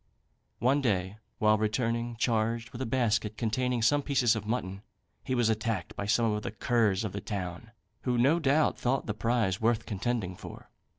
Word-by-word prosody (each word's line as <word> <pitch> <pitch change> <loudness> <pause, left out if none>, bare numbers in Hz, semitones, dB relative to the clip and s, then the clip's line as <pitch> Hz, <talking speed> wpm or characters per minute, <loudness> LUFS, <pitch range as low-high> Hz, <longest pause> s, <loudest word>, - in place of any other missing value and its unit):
One 135 +5 +2
day, 100 -5 0 0.2
while 110 0 +3
returning 115 +2 -1
charged 115 0 0
with 125 - -7
a 130 - -2
basket 110 -3 0
containing 120 +2 0
some 145 +6 +4
pieces 130 -5 +2
of 105 -1 -5
mutton, 100 -4 -3 0.4
he 130 - -1
was 120 -2 +2
attacked 110 -4 -1
by 100 - -4
some 115 +2 +3
of 105 0 -1
the - - -4
curs 110 -3 +1
of 105 - -3
the 100 - -5
town, 95 0 -5 0.3
who, 125 -2 0
no 140 +8 +4
doubt, 150 0 +2
thought 130 +2 0
the 105 - -2
prize 110 -2 0
worth 115 0 +1
contending 105 -3 -2
for. - - -11
115 Hz, 180 wpm, -29 LUFS, 105-120 Hz, 0.4 s, some